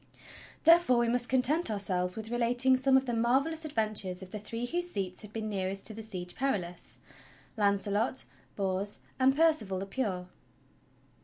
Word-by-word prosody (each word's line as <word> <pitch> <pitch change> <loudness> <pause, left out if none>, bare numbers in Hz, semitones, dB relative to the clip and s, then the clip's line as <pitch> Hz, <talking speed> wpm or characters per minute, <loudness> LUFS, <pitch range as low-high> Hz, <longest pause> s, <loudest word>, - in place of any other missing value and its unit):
Therefore 335 -7 +6
we 235 0 +2
must 245 0 0
content 265 +6 +3
ourselves 185 -3 0
with 220 +1 -6
relating 245 +2 +3
some 265 +1 +4
of 265 - 0
the 240 - -2
marvelous 275 +8 +1
adventures 215 -8 -1
of 185 - -12
the 210 - -5
three 230 +3 -4
whose 350 +6 -2
seats 190 - -4
had 210 - -11
been 220 0 -4
nearest 195 -1 -3
to 220 - +2
the 225 - -7
Siege 185 -5 -6
Perilous 190 -10 -3 0.3
— - - -25
Launcelot, 205 +3 0 0.3
Bors, 195 +1 -1 0.2
and 265 +1 +4
Percival 300 -12 +2
the 190 - -4
Pure. 195 -5 -3
220 Hz, 165 wpm, -30 LUFS, 195-260 Hz, 0.3 s, Therefore